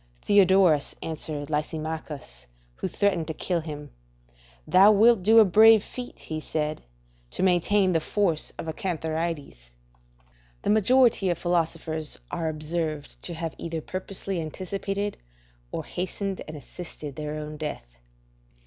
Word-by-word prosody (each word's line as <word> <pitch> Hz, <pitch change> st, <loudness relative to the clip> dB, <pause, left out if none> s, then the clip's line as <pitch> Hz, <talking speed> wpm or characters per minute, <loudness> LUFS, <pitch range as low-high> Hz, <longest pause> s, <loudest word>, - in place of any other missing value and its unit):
Theodorus 190 Hz, -6 st, +4 dB
answered 155 Hz, -2 st, -4 dB
Lysimachus, 150 Hz, -, -4 dB, 0.3 s
who -, -, -2 dB
threatened 185 Hz, -6 st, 0 dB
to 160 Hz, -, -4 dB
kill 175 Hz, 0 st, -1 dB
him, 150 Hz, -3 st, -7 dB, 0.7 s
"Thou 195 Hz, +3 st, +7 dB
wilt 220 Hz, 0 st, +5 dB
do 220 Hz, +5 st, +5 dB
a 220 Hz, -, +9 dB
brave 215 Hz, +3 st, +7 dB
feat," 250 Hz, -1 st, -8 dB, 0.2 s
said 155 Hz, 0 st, -2 dB
he, -, -, -10 dB
"to -, -, +6 dB
attain 190 Hz, +2 st, +2 dB
the 165 Hz, -, +3 dB
force 170 Hz, -2 st, 0 dB
of -, -, -6 dB
a 160 Hz, -, -2 dB
cantharides." 160 Hz, -, -4 dB, 0.9 s
The -, -, +2 dB
majority 220 Hz, -1 st, +4 dB
of 175 Hz, -, 0 dB
philosophers 165 Hz, -3 st, -1 dB
are 165 Hz, -1 st, -1 dB
observed 155 Hz, -1 st, -4 dB
to 170 Hz, -, -5 dB
have 165 Hz, -1 st, -4 dB
either 165 Hz, -1 st, -3 dB
purposely 185 Hz, +1 st, -4 dB
anticipated, 195 Hz, +5 st, -3 dB, 0.5 s
or -, -, -4 dB
hastened 190 Hz, +2 st, -3 dB
and 155 Hz, 0 st, -7 dB
assisted 150 Hz, -1 st, -9 dB
their 150 Hz, 0 st, -4 dB
own 150 Hz, 0 st, -6 dB
death. 150 Hz, -, -5 dB
165 Hz, 130 wpm, -26 LUFS, 155-195 Hz, 0.9 s, a